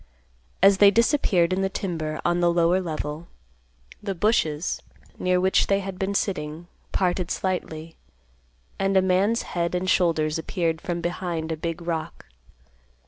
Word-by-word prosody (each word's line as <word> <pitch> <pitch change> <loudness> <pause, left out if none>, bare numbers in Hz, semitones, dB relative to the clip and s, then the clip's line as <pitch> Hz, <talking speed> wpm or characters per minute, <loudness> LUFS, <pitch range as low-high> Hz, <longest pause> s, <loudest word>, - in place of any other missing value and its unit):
As 195 0 +6
they 205 - +8
disappeared 200 - +2
in 190 - 0
the 195 - +1
timber 165 -6 -3
on 175 0 +2
the 175 -1 +3
lower 170 +2 +3
level, 155 -1 -5 0.7
the 200 -2 -3
bushes, 170 -5 0 0.4
near 180 0 +2
which 190 +1 +3
they 195 0 +2
had 190 -1 -6
been 195 +1 -1
sitting, 160 -4 -2 0.3
parted 180 -1 0
silently, 165 -4 -3 0.8
and 195 0 +2
a - - +6
man's 190 +5 +2
head 170 0 -1
and 180 +1 -1
shoulders 165 -4 +2
appeared 165 -1 -2
from 175 -1 -3
behind 170 -2 -3
a - - 0
big 165 +2 -4
rock. 165 -2 -4
175 Hz, 145 wpm, -25 LUFS, 165-190 Hz, 0.8 s, they